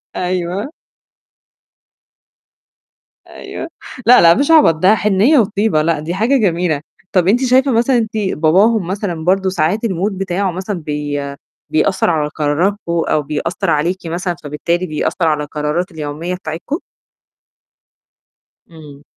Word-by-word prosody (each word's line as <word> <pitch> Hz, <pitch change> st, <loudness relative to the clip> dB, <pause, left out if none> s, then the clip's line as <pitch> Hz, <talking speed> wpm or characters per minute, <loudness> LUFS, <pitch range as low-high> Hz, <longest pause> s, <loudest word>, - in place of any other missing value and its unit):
أيوه. 180 Hz, -, -2 dB, 2.6 s
أيوه. 335 Hz, -, -8 dB, 0.4 s
لأ، 250 Hz, +2 st, +7 dB
لأ، 170 Hz, 0 st, +7 dB
مش 280 Hz, -, +1 dB
عبط، 300 Hz, -, +6 dB
ده 185 Hz, +7 st, +4 dB
حنيّة 210 Hz, +8 st, +3 dB
وطيبة، 205 Hz, -5 st, +1 dB
لأ، 165 Hz, 0 st, 0 dB
دي 155 Hz, +3 st, -4 dB
حاجة 225 Hz, +9 st, +2 dB
جميلة. 175 Hz, -, 0 dB, 0.3 s
طَب 180 Hz, -2 st, +2 dB
أنتِ 240 Hz, +7 st, +3 dB
شايفة 260 Hz, +2 st, +3 dB
مثلًا 240 Hz, +2 st, +2 dB
أنتِ 225 Hz, -1 st, -2 dB
باباهم 190 Hz, +2 st, +2 dB
مثلًا 185 Hz, -4 st, -3 dB
برضه 190 Hz, +1 st, +2 dB
ساعات 185 Hz, +5 st, 0 dB
الmood 195 Hz, 0 st, -1 dB
بتاعه 195 Hz, 0 st, -2 dB
مثلًا 185 Hz, +2 st, -4 dB
بي 150 Hz, -1 st, -3 dB, 0.5 s
بيأثّر 185 Hz, +5 st, +1 dB
على 155 Hz, -3 st, 0 dB
قرارتكم 160 Hz, +8 st, 0 dB
أو 165 Hz, -2 st, +1 dB
بيأثّر 150 Hz, +4 st, -3 dB
عليكِ 170 Hz, +5 st, +1 dB
مثلًا، 175 Hz, +2 st, -3 dB
فبالتالي 170 Hz, +5 st, -2 dB
بيأثّر 165 Hz, +2 st, -1 dB
على 150 Hz, -1 st, +1 dB
القرارات 150 Hz, +5 st, -3 dB
اليومية 160 Hz, +3 st, -5 dB
بتاعتكم؟ 180 Hz, -, -5 dB, 1.9 s
إمم. 150 Hz, -3 st, -13 dB
180 Hz, 125 wpm, -16 LUFS, 155-205 Hz, 2.6 s, لأ